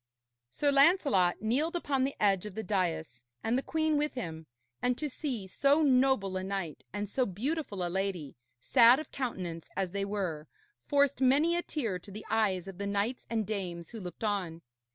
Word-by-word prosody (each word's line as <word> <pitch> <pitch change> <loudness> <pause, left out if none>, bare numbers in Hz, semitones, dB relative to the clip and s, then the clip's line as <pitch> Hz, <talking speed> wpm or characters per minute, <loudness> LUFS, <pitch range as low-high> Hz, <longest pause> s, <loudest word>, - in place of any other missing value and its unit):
Sir 285 - +1
Lancelot 275 - +4
kneeled 285 +10 +1
upon 280 -6 0
the 275 - -3
edge 200 -1 +2
of 200 - -10
the 220 - -3
dais, 165 - -2 0.2
and 225 +2 +1
the 260 - +2
queen 315 +1 +1
with 300 0 -1
him; 160 -9 -5 0.3
and 245 0 +1
to 305 - -2
see 255 -7 -4
so 280 +10 +3
noble 255 -8 +3
a 185 - -3
knight 190 -5 -4
and 205 +1 -3
so 255 +6 0
beautiful 215 - -2
a - - 0
lady, 180 -5 -2 0.2
sad 235 - +6
of 310 - -8
countenance 180 -11 -4
as 190 -2 -1
they 200 +1 -2
were, 180 -7 -3 0.4
forced 285 -3 +2
many 290 +6 +4
a 345 - +1
tear 230 - -3
to 190 - -13
the 205 +2 -8
eyes 195 -5 +1
of 190 -1 -9
the 200 - -2
knights 205 +5 -1
and 225 -2 0
dames 180 -5 -4
who 230 - -7
looked 180 +1 -8
on. 185 -6 -2
210 Hz, 190 wpm, -31 LUFS, 185-270 Hz, 0.4 s, sad